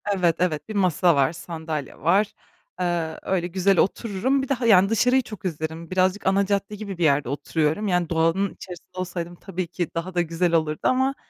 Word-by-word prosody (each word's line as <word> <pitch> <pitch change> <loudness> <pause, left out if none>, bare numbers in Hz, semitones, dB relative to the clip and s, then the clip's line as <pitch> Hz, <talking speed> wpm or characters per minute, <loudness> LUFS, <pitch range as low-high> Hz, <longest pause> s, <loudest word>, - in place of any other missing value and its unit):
Evet, 175 -3 +2
evet, 180 +1 -1
1 215 - -5
masa 180 -3 +3
var, 140 +3 +2
sandalye 160 -4 -6
var. 200 +5 +2 0.5
Eee, 170 -3 -1
öyle 180 -2 -1
güzel 190 +1 +2
otururum, 230 +7 +1
bir 270 - -5
de, - - +3
ha, 245 -2 -3
yani, 195 -3 +6
dışarıyı 250 +4 +3
çok 215 -5 -10
izlerim. 160 0 -4
Birazcık 185 +2 +1
ana 195 +1 +3
cadde 200 +1 -1
gibi 200 -3 -6
bir 175 - -1
yerde 140 -4 +3
oturuyorum. 155 +7 -1
Yani, 180 -3 +1
doğanın 165 +4 +1
içerisinde 180 0 -11
olsaydım 175 -1 -4
tabii 185 -1 -5
ki 175 0 -3
daha 175 +2 -3
da 175 - +2
güzel 170 +1 0
olurdu 155 -2 +1
ama, 265 +1 +2
180 Hz, 190 wpm, -24 LUFS, 165-200 Hz, 0.5 s, yani